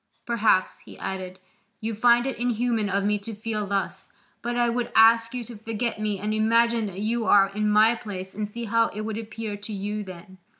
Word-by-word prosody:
Perhaps," 225 -5 +2
he - - -14
added, 185 -1 -5 0.4
"you 225 +1 -3
find 240 +2 +4
it 270 -3 -3
inhuman 235 -3 0
of 200 +1 0
me 210 +1 +1
to 215 +2 -7
feel 215 -1 -3
thus, 195 0 -3 0.3
but 240 0 -3
I 240 0 +3
would 235 0 -1
ask 230 +1 +6
you 245 - -3
to 235 +1 -10
forget 225 +1 -3
me 210 -1 -1
and 210 +2 -2
imagine 230 +1 +2
that 195 0 -6
you 225 +2 0
are 195 -1 +6
in 210 +1 0
my 215 +2 +5
place 190 -4 -7
and 210 +1 -4
see 235 +3 -6
how 230 +1 +3
it 210 - -3
would 220 0 -3
appear 225 -1 -5
to 205 +2 -9
you 210 +1 -3
then. 185 0 -11
215 Hz, 210 wpm, -25 LUFS, 205-230 Hz, 0.4 s, ask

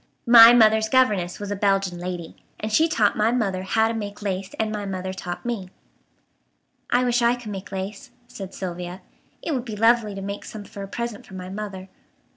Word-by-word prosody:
"My 235 -1 +10
mother's 220 -2 +5
governess 210 -9 +2
was 205 0 -5
a - - -1
Belgian 195 -3 0
lady, 175 -2 -6 0.2
and 215 0 -4
she 320 +8 +5
taught 215 -9 +2
my 215 +2 +2
mother 200 -7 0
how 220 +4 +2
to 225 - -2
make 205 -2 -6
lace 190 -1 -3
and 220 -1 0
my 210 -1 -3
mother 190 -1 -4
taught 175 +1 -6
me." 220 -6 -3 1.2
"I 245 +1 +3
wish 245 -1 +2
I 235 +1 +4
could 240 -4 -8
make 190 -1 -7
lace," 200 +7 -6 0.2
said 195 -6 -8
Sylvia. 180 0 -6 0.4
"It 320 - -2
would 255 -3 -1
be 225 -4 -6
lovely 225 -1 +3
to 195 - -6
make 200 +1 -5
some 215 -1 -8
for 200 - -10
a 195 - -5
present 235 +1 -5
for 190 - -11
my 185 0 -7
mother." 195 -1 -6
205 Hz, 205 wpm, -24 LUFS, 190-230 Hz, 1.2 s, My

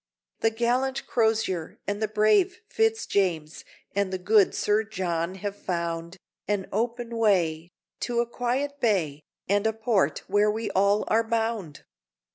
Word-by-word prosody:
The 225 - +3
gallant 245 +4 0
Crozier, 220 -7 0
and 205 0 -2 0.2
brave 215 - +3
Fitz 445 +1 +1
James, 165 -6 -1 0.3
And 200 -1 0
the 185 - -1
good 200 +2 +3
Sir 210 +1 +2
John 185 -4 -2
have 200 +1 -4
found 170 -2 -3 0.3
An 205 -2 0
open 235 +2 -2
way, 175 -7 +2 0.3
to 240 -1 -1
a 240 - +2
quiet 260 +4 -2
bay, 170 - +1 0.3
And 205 +2 +2
a 220 - +1
port 220 -2 +1
where 205 +2 +3
we 215 0 -2
all 200 +2 +3
are 225 +1 +3
bound! 225 -8 -2
210 Hz, 140 wpm, -26 LUFS, 185-230 Hz, 0.3 s, The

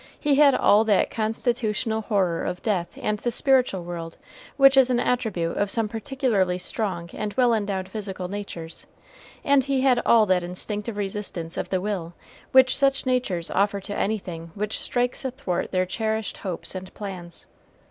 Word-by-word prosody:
He 295 -2 +2
had 280 -1 +6
all 210 +2 +5
that 210 -3 +2
constitutional 220 0 -1
horror 190 -6 0
of 180 0 -4
death 185 -6 -1
and 210 0 -1
the 240 - -1
spiritual 250 -7 +2
world 170 -1 -7 0.4
which 275 -1 +7
is 265 -1 +6
an 245 -1 +2
attribute 215 -10 -1
of 205 - +1
some 225 +1 +1
particularly 225 -6 0
strong 180 -2 -3
and 210 -1 -4
well 245 -2 +4
endowed 200 -3 -1
physical 190 -3 -5
natures, 180 -4 -7 0.6
and 280 -1 +4
he 275 -1 +1
had 255 -2 +3
all 225 -2 +5
that 185 -2 +2
instinctive 205 +5 -4
resistance 195 -4 -4
of - - -3
the 185 - 0
will 180 -4 -3 0.4
which 260 0 +6
such 275 -1 +2
natures 245 -10 -1
offer 200 +1 +1
to 205 +2 -5
anything 180 -6 -3
which 210 +1 -2
strikes 245 +2 -1
athwart 260 -9 -3
their 185 -1 +1
cherished 220 +2 -2
hopes 185 -4 -5
and 185 0 -7
plans. 180 -4 -7
210 Hz, 165 wpm, -24 LUFS, 185-245 Hz, 0.6 s, which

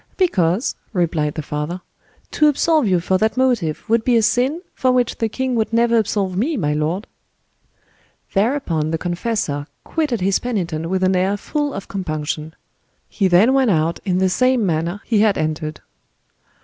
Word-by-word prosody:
"Because," 200 - +1 0.2
replied 160 -5 0
the 155 - -4
father, 150 +5 -4 0.5
"to 300 - +3
absolve 300 -2 +2
you 185 -2 +3
for 185 +2 0
that 220 +3 +1
motive 235 -12 0
would 225 0 +2
be 245 -1 +3
a 225 - +3
sin 265 - +1
for 255 - +1
which 250 -2 0
the 225 - 0
king 260 +3 -2
would 225 -2 0
never 235 0 +3
absolve 205 -4 0
me, 270 - 0
my 150 -8 0
lord." 155 +7 -1 1.3
Thereupon 195 - 0
the 165 - -1
confessor 175 -5 -2 0.2
quitted 295 -8 -1
his 190 +1 +1
penitent 170 -9 -3
with 190 0 0
an 185 0 +3
air 190 +3 +1
full 290 +6 -2
of 195 - -7
compunction. 155 -3 -4 0.5
He 195 - +1
then 190 +8 +5
went 265 -3 +3
out 165 -2 +1
in 185 -3 0
the 190 0 +3
same 255 +4 +2
manner 170 +3 -1
he 220 -3 +2
had 210 -2 +3
entered. 155 0 -3
195 Hz, 170 wpm, -20 LUFS, 165-240 Hz, 1.3 s, then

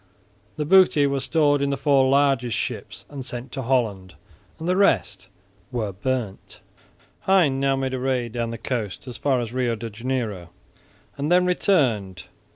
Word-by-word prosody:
The 150 - -2
booty 185 -3 +5
was 140 -1 -1
stored 145 -3 +2
in 140 - +1
the 140 - -1
four 135 -1 +3
largest 135 -4 +2
ships - - -5
and 140 -2 -7
sent 125 0 -7
to 135 - -4
Holland; 110 -7 -1 0.4
the 175 +3 0
rest 105 - +1 0.4
were 110 -5 -2
burnt. 110 0 -4 0.7
Hein 170 -9 +4
now 135 0 +2
made 135 -1 -2
a 130 - -2
raid 125 -2 -1
down 115 0 -2
the 115 - -5
coast 115 -3 -4
as 125 - -7
far 135 -3 +1
as 120 -1 -4
Rio 125 -2 0
de 115 +1 -7
Janeiro 110 -6 -3 0.7
and 145 +3 -2
then 180 0 +5
returned. 125 - +1
130 Hz, 165 wpm, -23 LUFS, 115-140 Hz, 0.7 s, booty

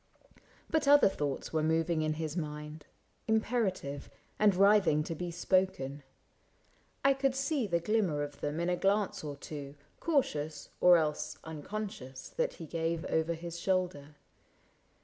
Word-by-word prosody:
But 315 -3 0
other 290 0 +7
thoughts 145 -8 -3
Were 160 - +2
moving 160 +1 +1
in 155 0 0
his 155 0 -4
mind, 150 -2 -5 0.4
imperative, 215 - 0 0.3
And 210 -3 +5
writhing 195 -6 +5
to 165 - -4
be 175 +2 -4
spoken: 170 -5 0 1.0
I 275 - +7
could 270 -1 0
see 275 -3 0
The 170 -3 +1
glimmer 175 -6 +1
of 145 -1 -8
them 150 +2 -2
in 170 - 0
a 180 - +2
glance 195 +1 +1
or 145 -2 -5
two, 140 0 -8 0.2
Cautious, 155 - -1
or 180 -1 +7
else 155 -2 -1
unconscious, 155 -5 -6
that - - -1
he 165 - -9
gave 165 +1 -2
Over 160 +1 +1
his 170 +1 -7
shoulder 175 -6 -1
165 Hz, 145 wpm, -32 LUFS, 150-200 Hz, 1.0 s, other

